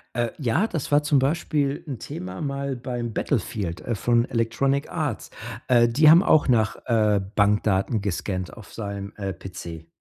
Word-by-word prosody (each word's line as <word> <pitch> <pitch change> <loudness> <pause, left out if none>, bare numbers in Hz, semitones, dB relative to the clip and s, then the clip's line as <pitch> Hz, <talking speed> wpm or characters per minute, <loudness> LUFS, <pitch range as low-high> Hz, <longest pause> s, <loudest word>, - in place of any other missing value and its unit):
Äh, 120 -1 0
ja, 145 - +1
das 160 -8 -4
war 145 +1 +5
zum 145 -1 +3
Beispiel 145 0 0
'n 135 - -4
Thema 90 -2 -7
mal 140 -1 -2
beim 120 -2 -4
Battlefield, 90 -6 -2
äh, 120 - -2
von 120 +3 +2
Electronic 130 +5 0
Arts. 150 -9 -3 0.4
Äh, 120 -2 +5
die 150 +7 +5
haben 165 +3 +8
auch 155 -8 +4
nach, 110 -4 +2
äh, 110 -4 +3 0.2
Bankdaten 105 +1 +2
gescannt 95 -1 -3
auf 110 - -13
seinem, 100 -2 -5
äh, 100 -1 -3
PC. 85 -2 -9
115 Hz, 160 wpm, -24 LUFS, 100-140 Hz, 0.4 s, haben